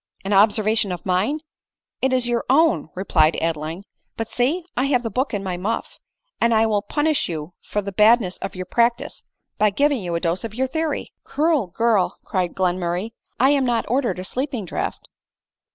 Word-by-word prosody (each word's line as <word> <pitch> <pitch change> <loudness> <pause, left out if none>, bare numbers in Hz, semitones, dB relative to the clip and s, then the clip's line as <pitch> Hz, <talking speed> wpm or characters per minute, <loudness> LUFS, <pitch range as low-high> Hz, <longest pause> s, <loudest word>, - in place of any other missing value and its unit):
" - - -33
An 200 - 0
observation 210 0 +3
of 180 - -6
mine! 200 +12 +1 0.6
It 265 - +2
is 255 -2 +1
your 240 -1 0
own," 270 - +3
replied 165 -4 +2
Adeline; 165 +2 -3 0.2
" - - -50
but 225 -1 -4
see, 285 +9 +1
I 255 - +1
have 255 -3 +2
the 225 - -3
book 260 +7 -1
in 205 -2 -3
my 185 -2 -3
muff; 210 +6 -3 0.4
and 235 -1 +4
I 220 +1 +4
will 210 -2 +1
punish 295 +3 0
you 160 0 -5
for 210 - -3
the 200 - -4
badness 210 -1 +4
of - - -5
your 185 0 -5
practice, 235 +4 0 0.4
by 215 +1 +5
giv 285 +9 +2
ing 265 -6 -1
you 175 -2 -3
a - - +1
dose 170 +3 -1
of 220 -2 -6
your 260 +2 +1
theory." 315 +2 -3
"Cruel 300 - +1
girl!" 215 +1 +1
cried 180 -2 -1
Glenmurray, 180 +2 -1 0.2
" - - -46
I 265 +2 +5
am 280 -2 +3
not 240 -3 +1
ordered 255 -4 +1
a 185 - -5
sleeping 250 0 -3
draught - - -4
220 Hz, 200 wpm, -22 LUFS, 185-255 Hz, 0.6 s, by